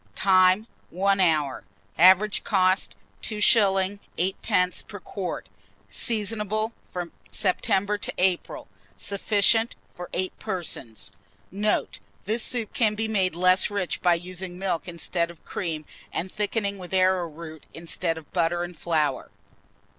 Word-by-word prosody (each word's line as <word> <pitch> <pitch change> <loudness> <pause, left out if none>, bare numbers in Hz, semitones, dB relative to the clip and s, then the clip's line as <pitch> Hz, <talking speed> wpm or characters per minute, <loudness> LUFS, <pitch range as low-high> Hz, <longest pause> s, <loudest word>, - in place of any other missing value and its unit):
Time. 185 +2 +4 0.2
1 195 +2 +1
hour. 155 -7 +2 0.3
Average 190 +4 +5
cost, 185 -2 +2 0.3
2s. 205 -2 +3 0.2
8d. 185 0 0
per 205 - -8
quart. 190 -1 -5 0.4
Seasonable 215 -1 0 0.2
from 175 -2 -5 0.2
September 205 +1 +1
to - - -3
April. 180 -1 0 0.3
Sufficient 210 +3 +2 0.2
for 180 0 -8
8 185 +1 -3
persons. 140 -11 -3 0.4
Note. 210 +3 0 0.3
This 220 +4 0
soup 230 -4 -2
can 220 -6 +2
be 220 +1 -1
made 190 -5 +1
less 185 +2 +4
rich 200 -3 -2
by 175 -1 +4
using 180 +1 -5
milk 185 -3 -2
instead 170 0 -1
of 170 -3 -14
cream, 160 -4 -3 0.3
and 185 +2 -3
thickening 205 -1 -2
with 180 +1 -5
arrowroot 170 -4 0
instead 165 0 -2
of 160 -2 -12
butter 175 0 +1
and 175 0 -6
flour. 155 -5 0
185 Hz, 125 wpm, -26 LUFS, 175-205 Hz, 0.4 s, Average